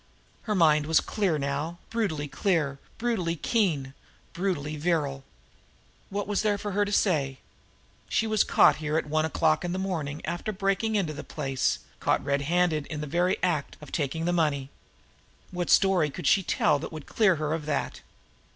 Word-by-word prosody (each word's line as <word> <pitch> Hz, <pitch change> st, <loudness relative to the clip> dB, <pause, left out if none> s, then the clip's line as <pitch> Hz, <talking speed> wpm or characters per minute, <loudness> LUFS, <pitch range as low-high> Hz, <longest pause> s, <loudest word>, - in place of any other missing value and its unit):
Her 210 Hz, -, +2 dB
mind 155 Hz, -4 st, +4 dB
was 160 Hz, -, +5 dB
clear 195 Hz, -7 st, 0 dB
now, 145 Hz, +4 st, -2 dB
brutally 185 Hz, -11 st, -1 dB
clear, 150 Hz, -4 st, 0 dB, 0.2 s
brutally 220 Hz, -8 st, -1 dB
keen, 155 Hz, -, 0 dB, 0.4 s
brutally 165 Hz, -5 st, -2 dB
virile. 145 Hz, -4 st, -1 dB, 0.9 s
What 200 Hz, 0 st, -3 dB
was 205 Hz, -1 st, 0 dB
there 210 Hz, -2 st, +1 dB
for 205 Hz, +1 st, -4 dB
her 205 Hz, +1 st, +1 dB
to 205 Hz, -, -4 dB
say? 145 Hz, -10 st, +1 dB, 0.7 s
She 225 Hz, -, +1 dB
was 215 Hz, -1 st, +3 dB
caught -, -, +5 dB
here 155 Hz, 0 st, -1 dB
at -, -, 0 dB
one 155 Hz, +1 st, +1 dB
o'clock 155 Hz, -1 st, +1 dB
in 175 Hz, 0 st, -2 dB
the -, -, -2 dB
morning 160 Hz, -6 st, -3 dB
after 175 Hz, +5 st, -3 dB
breaking 195 Hz, +2 st, 0 dB
into 175 Hz, -7 st, 0 dB
the 145 Hz, -, -7 dB
place, 135 Hz, -4 st, -1 dB, 0.2 s
caught -, -, +1 dB
red 140 Hz, 0 st, +1 dB
handed 160 Hz, -1 st, +1 dB
in 150 Hz, -2 st, -5 dB
the -, -, -3 dB
very 175 Hz, +5 st, +1 dB
act 170 Hz, -6 st, 0 dB
of 150 Hz, -, -12 dB
taking 160 Hz, +2 st, -2 dB
the 175 Hz, -, +1 dB
money. 145 Hz, -5 st, 0 dB, 0.8 s
What 175 Hz, -1 st, -3 dB
story 190 Hz, -6 st, +4 dB
could 175 Hz, +5 st, -7 dB
she 195 Hz, -, +5 dB
tell 150 Hz, -4 st, +2 dB
that 155 Hz, -, -6 dB
would 155 Hz, -3 st, -8 dB
clear 210 Hz, -5 st, +3 dB
her 155 Hz, 0 st, -2 dB
of 160 Hz, -2 st, -4 dB
that! 145 Hz, -2 st, -2 dB
165 Hz, 180 wpm, -27 LUFS, 150-190 Hz, 0.9 s, was